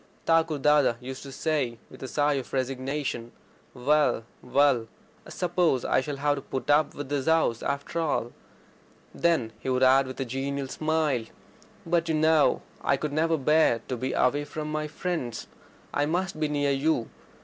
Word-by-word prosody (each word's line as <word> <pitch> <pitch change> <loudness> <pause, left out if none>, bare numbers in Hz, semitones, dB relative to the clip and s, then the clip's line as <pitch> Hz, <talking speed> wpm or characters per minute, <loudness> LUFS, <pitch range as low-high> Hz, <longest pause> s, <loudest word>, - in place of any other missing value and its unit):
Thakur 165 -2 +3
Dada 145 -3 +4
used 130 +1 -7
to 140 - -9
say, 135 -6 -1 0.2
after - - -9
a - - -16
long 130 - -5
sigh 145 +2 +1
of 135 -3 -4
resignation: 130 -2 -2 0.4
"Well, 130 -3 +2 0.2
well, 125 -3 +2 0.4
I - - -11
suppose 175 -7 +1
I - - +2
shall 145 +2 -4
have 145 +1 +1
to - - -4
put 135 +2 -3
up 150 +1 +3
with 145 -2 -6
this 145 -1 -2
house 160 -8 +2
after 140 +4 -3
all." 145 -7 -1 0.8
Then 155 -10 +1
he - - -4
would 130 0 +2
add 130 +1 +5
with 130 - -8
a 135 - -1
genial 135 +2 -3
smile: 155 -6 0 0.6
"But, 170 0 +1
you 160 - +2
know, 155 -1 +3 0.2
I 140 - +2
could 150 +1 -3
never 160 +1 +2
bear 150 -4 +3
to 130 - -1
be 130 +2 -3
away 145 +3 +2
from 150 +1 -5
my 155 0 -2
friends. 155 -6 -4 0.5
I 145 0 +1
must 175 0 -1
be 155 - +1
near 145 -1 0
you. 140 -3 0
145 Hz, 180 wpm, -27 LUFS, 130-155 Hz, 0.8 s, add